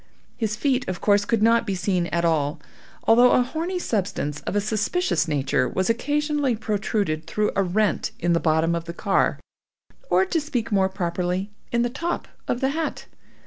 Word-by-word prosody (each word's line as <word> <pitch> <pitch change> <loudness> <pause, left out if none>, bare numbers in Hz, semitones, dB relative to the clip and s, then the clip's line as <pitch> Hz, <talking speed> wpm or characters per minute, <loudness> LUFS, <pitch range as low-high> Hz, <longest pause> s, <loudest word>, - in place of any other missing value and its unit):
His 215 -2 -1
feet, 255 +1 0
of 185 - -3
course, 205 0 +3
could 225 -1 +1
not 230 0 +4
be 195 - 0
seen 180 -1 0
at 170 +2 0
all, 150 -3 +1 0.4
although 240 +2 +6
a 250 - +4
horny 330 +8 -3
substance 185 - -2
of 205 0 0
suspicious 220 - 0
nature 135 -4 +1
was 190 +4 +1
occasionally 290 +1 0
protruded 205 -7 -2
through 210 0 0
a - - +3
rent 200 +3 +1
in 175 0 +1
the 170 - +3
bottom 160 +1 +2
of 170 0 -2
the 170 - -6
car, 200 0 +1 0.7
or 380 - +4
to 340 -4 0
speak 250 -7 -3
more 190 -2 +3
properly, 180 +1 -2 0.2
in 235 0 +2
the 240 - 0
top 335 +7 -3 0.2
of 245 - -1
the 265 - +2
hat. 315 +2 -3
210 Hz, 180 wpm, -24 LUFS, 175-245 Hz, 0.7 s, although